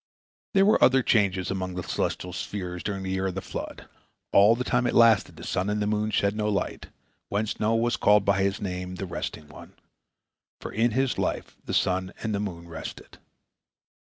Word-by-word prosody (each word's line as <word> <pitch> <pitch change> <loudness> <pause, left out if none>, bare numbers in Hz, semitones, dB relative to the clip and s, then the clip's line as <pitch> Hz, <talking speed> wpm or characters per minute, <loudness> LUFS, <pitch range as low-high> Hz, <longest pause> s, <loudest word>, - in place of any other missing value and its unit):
There 195 0 +6
were 215 - +4
other 130 0 +5
changes 100 -5 +2
among 95 -1 -3
the 90 - -3
celestial - - -2
spheres 90 -3 -5
during 100 -2 -3
the 95 - -3
year 95 0 0
of 95 - -4
the - - -1
flood. - - -7 0.5
All 105 +3 +7
the 125 - -2
time 125 0 +1
it - - -1
lasted, 115 -4 +5
the - - -10
sun 95 +3 -1
and 105 0 0
the 105 - 0
moon 105 +1 0
shed 100 0 +1
no 105 0 0
light, 100 - -2 0.4
whence 105 +2 -2
Noah 110 +1 +2
was 120 +1 +1
called 105 0 +4
by 100 -1 +2
his 100 +1 0
name, 90 -1 -4
"the 95 - -4
resting 75 -3 -5
one," 75 - -13 0.9
for - - -7
in 115 +3 +2
his 130 +3 0
life - - -2
the - - -5
sun 95 0 0
and 110 - -1
the 100 - 0
moon 85 -5 -5
rested. 80 -1 -9
100 Hz, 200 wpm, -26 LUFS, 95-110 Hz, 0.9 s, All